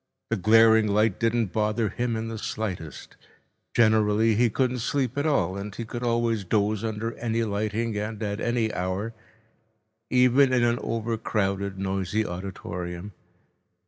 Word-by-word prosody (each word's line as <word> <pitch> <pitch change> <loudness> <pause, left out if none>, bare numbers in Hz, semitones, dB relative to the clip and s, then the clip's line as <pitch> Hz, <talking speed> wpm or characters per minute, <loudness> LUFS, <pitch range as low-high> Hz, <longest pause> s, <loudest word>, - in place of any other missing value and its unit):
The - - +3
glaring 110 +2 +5
light 105 0 +2
didn't 115 -3 0
bother 105 0 0
him 120 +3 -2
in 110 0 -3
the 115 -1 -5
slightest. 95 -9 -5 0.6
Generally 110 0 +4
he 120 +2 +3
couldn't 125 +2 0
sleep 130 +1 -1
at 145 +2 0
all, 95 - +1
and 100 +1 -6
he 115 - -5
could 120 +2 -6
always 115 -3 0
doze 105 +2 0
under 110 +1 -3
any 115 -1 0
lighting 110 +1 -2
and 105 0 -4
at 105 +1 -3
any 120 -2 0
hour, 95 +5 -2 1.0
even 130 +1 +4
in 125 -1 +3
an 120 0 +2
overcrowded, 105 -4 -2
noisy 95 +2 -1
auditorium. 90 0 -6
110 Hz, 145 wpm, -26 LUFS, 100-115 Hz, 1.0 s, glaring